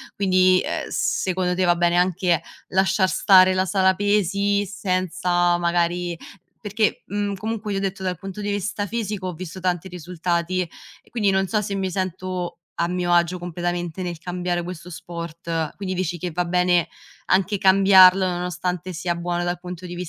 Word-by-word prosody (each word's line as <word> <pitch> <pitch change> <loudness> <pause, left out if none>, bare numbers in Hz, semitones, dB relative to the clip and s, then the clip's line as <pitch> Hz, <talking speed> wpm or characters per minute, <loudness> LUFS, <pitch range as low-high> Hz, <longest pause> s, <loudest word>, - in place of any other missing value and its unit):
quindi, 185 -1 +4
ehm, - - -3
secondo 185 -1 0
te 185 - +1
va 175 0 +4
bene 175 0 +2
anche 180 -2 +2 0.3
lasciar 190 0 +2
stare 185 0 +5
la 185 0 +2
sala 190 -1 +2
pesi, 205 0 +1
senza 180 -2 0
magari 175 0 0 0.5
perché, 210 0 0
mhmm, 205 0 -2
comunque 215 0 -4
io 195 - -1
ho - - -4
detto, 195 -1 -3
dal 180 -2 -2
punto 195 +1 -8
di 205 0 -2
vista 205 +1 -2
fisico 210 -4 -3
ho 180 - -4
visto 180 +2 -8
tanti 180 0 -1
risultati 175 +1 -2
e 170 - -11
quindi 210 -4 +1
non 190 0 +1
so 215 +2 +1
se 200 0 -4
mi 190 -1 -1
sento 185 -1 -4 0.2
a 170 - +1
mio 180 -1 0
agio 175 +1 +2
completamente 175 0 -3
nel 175 -2 -4
cambiare 175 0 -2
questo 175 0 -8
sport, 170 -1 -5
quindi 190 -2 -3
dici 180 -1 -2
che 175 +1 -4
va 180 +3 0
bene 180 0 +2 0.4
anche 195 +2 +2
cambiarlo, 190 -1 +6
nonostante 180 0 -3
sia 175 0 -2
buono 175 0 -2
dal 175 0 -2
punto 180 0 -8
di 175 0 -7
180 Hz, 170 wpm, -23 LUFS, 175-190 Hz, 0.5 s, cambiarlo